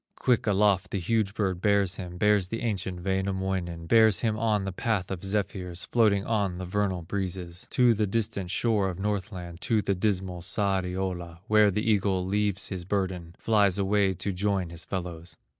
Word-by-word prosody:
Quick 125 -3 +1
aloft 100 -2 +3
the 100 - -2
huge 105 +2 0
bird 95 -4 -1
bears 100 -3 +2
him, 90 -1 -7
Bears 105 -2 +3
the 115 +4 -4
ancient 95 -6 -2
Wainamoinen, 95 -3 -2
Bears 110 +2 +5
him 110 -3 +1
on 110 -3 0
the 95 - -2
path 95 -1 -1
of 95 -1 -5
zephyrs, 95 -3 -2
Floating 105 -4 +2
on 100 -5 0
the 90 - -5
vernal 95 -1 -1
breezes, 90 -1 -5
To 125 -2 +4
the 105 -1 0
distant 100 -3 -1
shore 105 -1 +1
of 90 - -5
Northland, 95 -4 -4
To 110 -3 +1
the 100 - +1
dismal 95 -2 -1
Sariola, 90 -3 -2
Where 105 -1 +5
the 105 +3 -1
eagle 100 -3 +2
leaves 100 0 0
his 95 -3 -4
burden, 90 -3 -3
Flies 100 -4 +2
away 100 -1 +2
to 100 - -2
join 95 -2 -1
his 85 -1 -7
fellows. 90 -2 -6
95 Hz, 175 wpm, -27 LUFS, 90-105 Hz, -, Bears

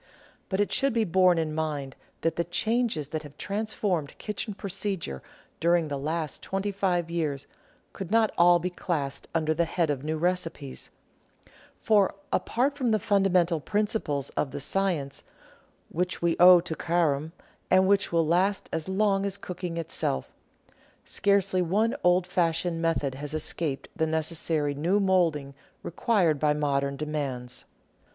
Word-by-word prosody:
But 190 - -1
it 205 - +1
should 275 -2 +2
be 230 -1 +2
borne 185 -2 +4
in 160 -1 -1
mind 150 -4 -3 0.3
that 165 - 0
the 170 - 0
changes 215 - 0
that 155 0 -3
have 145 -1 -13
transformed 200 -6 -2
kitchen 210 0 -4
procedure 195 - -3 0.4
during 170 -1 +2
the 140 - -2
last 155 +1 -3
twenty 195 +1 -2
five 180 -4 0
years 150 -5 -2 0.5
could 195 - -6
not 225 0 +3
all 175 +1 +6
be 180 +2 -3
classed 155 -6 -3
under 155 -1 +2
the 170 +2 +1
head 165 -1 0
of 135 -2 -3
new 155 +1 -2
recipes; 165 -5 -2 0.9
for, 205 -3 +3 0.2
apart 270 +4 +1
from 260 -4 0
the 220 - +3
fundamental 190 -6 +2
principles 205 - -1
of 145 - -1
the - - -6
science, 160 -3 -1 0.7
which 180 +2 -2
we 170 -1 +1
owe 180 0 +9
to 170 -2 -4
Careme, 160 -3 0 0.4
and 185 0 +5
which 200 +1 +2
will 165 -1 +2
last 185 +5 +1
as 160 +2 -2
long 195 0 +2
as 200 -1 -1
Cooking 180 -2 -5
itself, 150 - -2 0.7
scarcely 195 -2 +2
one 205 +7 +1
old 180 0 +4
fashioned 170 -2 0
method 165 -5 0
has 145 +3 -5
escaped 155 -2 -1
the 160 -1 0
necessary 160 -2 0
new 170 +8 +1
moulding 170 -8 +1 0.3
required 175 -5 +1
by 150 0 +2
modern 140 -2 0
demands. 135 -5 -4
170 Hz, 150 wpm, -27 LUFS, 155-195 Hz, 0.9 s, owe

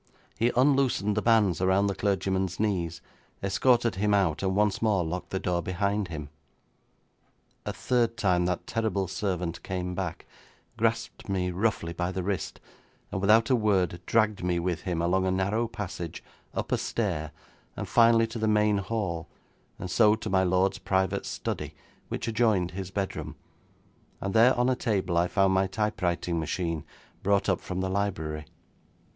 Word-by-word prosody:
He 115 +2 +2
unloosened 130 -6 +3
the 105 - +1
bands 105 -7 +3
around 95 +2 +3
the 100 - +1
clergyman's 95 -2 -1
knees, 90 -6 -1 0.4
escorted 115 +2 +2
him 105 +1 +2
out, 90 -6 +1
and 95 -1 0
once 105 0 +2
more 105 -5 +2
locked 90 +3 -4
the 95 - -2
door 90 -1 0
behind 100 +3 -1
him. 75 -4 -6 1.4
A - - 0
third 120 -2 0
time 90 -3 +2
that 90 -1 -2
terrible 110 -4 -1
servant 90 -3 -3
came 90 -1 -3
back, 90 -2 -4 0.5
grasped 115 -1 -1
me 90 -2 0
roughly 90 -3 -1
by 90 +1 -2
the 95 -1 -3
wrist, 100 0 -3 0.5
and 95 - -2
without 110 +5 +4
a - - +6
word 95 -6 +1
dragged 110 -4 +2
me 90 -1 +1
with 85 -1 -1
him, 85 -2 -2
along 95 +2 +2
a - - +2
narrow 100 +5 0
passage, 100 -7 -6 0.3
up - - -3
a - - +2
stair, 85 -9 -2 0.5
and - - -4
finally 115 -1 +5
to 115 0 -6
the 110 - +1
main 105 -1 +3
hall, 95 -6 -3 0.5
and 90 - -6
so 110 -2 +5
to 110 -2 -6
my 95 -1 +4
lord's 95 +1 +2
private 95 -1 0
study, - - -4 0.3
which - - -4
adjoined 110 -6 +2
his 95 +1 -5
bedroom, 95 0 -4 0.8
and 100 - -3
there 115 +3 +6
on 125 0 +3
a 130 - +2
table 95 -8 -1
I 85 +1 +3
found 95 0 +2
my 95 0 +3
typewriting 90 -5 -1
machine 80 0 -2 0.4
brought 100 0 +2
up 95 -3 +1
from 90 0 -4
the 95 - -1
library. 80 -6 -2
95 Hz, 165 wpm, -28 LUFS, 90-110 Hz, 1.4 s, a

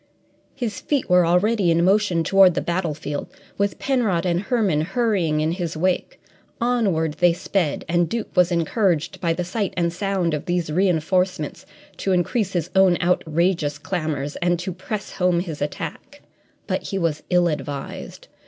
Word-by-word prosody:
His 230 -7 -3
feet 280 -10 -1
were 180 -1 +5
already 190 +2 +2
in 170 +1 +3
motion 190 -4 +2
toward 190 -1 +5
the - - +1
battlefield, 155 -5 -3 0.3
with 200 0 0
Penrod 225 -11 0
and 175 0 +1
Herman 210 - +1
hurrying 180 -5 0
in 155 +1 +1
his 170 -2 -3
wake. 185 +2 -1 0.4
Onward 195 -11 +1
they 175 -1 +5
sped, 170 -3 -1
and 175 0 +1
Duke 230 -1 -4
was 180 -1 +4
encouraged 170 -1 0
by 170 -2 +1
the 180 - -2
sight 195 +3 -3
and 170 -1 +1
sound 185 -3 -1
of 150 - -3
these 175 -3 -1
reinforcements 180 -1 0 0.3
to 190 - 0
increase 190 +3 0
his 175 -1 -2
own 190 -2 +5
outrageous 170 -3 +1
clamours 150 -2 -3
and 175 0 +1
to 185 +2 -4
press 205 +3 -5
home 180 -2 +1
his 165 -4 -5
attack. 145 - -6 0.4
But - - -2
he 195 - -3
was 165 -5 -1
ill 180 -1 +4
advised. 145 -3 -5
175 Hz, 160 wpm, -22 LUFS, 165-195 Hz, 0.4 s, were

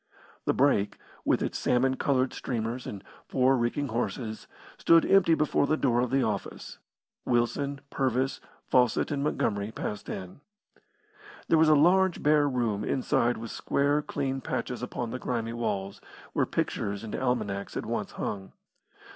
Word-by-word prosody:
The - - +2
brake, 125 -7 +2 0.3
with - - +2
its - - -2
salmon 130 +2 +2
coloured 130 -1 +1
streamers 120 0 -3
and 100 - -7 0.2
four 130 0 +3
reeking 125 +3 -1
horses, 110 0 -3 0.3
stood 165 0 +5
empty 180 -4 +5
before 150 -2 +1
the 155 - +2
door 120 -5 +2
of 125 - 0
the 135 +1 +2
office; 105 -3 -4 0.4
Wilson, 135 +4 0
Purvis, 130 0 0 0.3
Fawcett 125 +3 +2
and 140 -1 -1
Montgomery 100 -7 -1
passed 105 -2 -5
in. 95 +8 -7 1.1
There 165 - +5
was 160 0 +5
a 155 - +7
large, 180 +4 +4
bare 150 -1 +4
room 115 -6 -1
inside 120 0 +1
with 115 0 -7
square, 145 +1 +1
clean 135 -2 -3
patches 125 -1 -3
upon 120 -1 -4
the 130 - -4
grimy 115 -2 -2
walls, 100 -4 -3 0.3
where - - +1
pictures 100 +1 -2
and 110 - -5
almanacs 110 -6 -2
had - - -3
once - - -3
hung. 95 -2 -5
125 Hz, 150 wpm, -28 LUFS, 110-140 Hz, 1.1 s, a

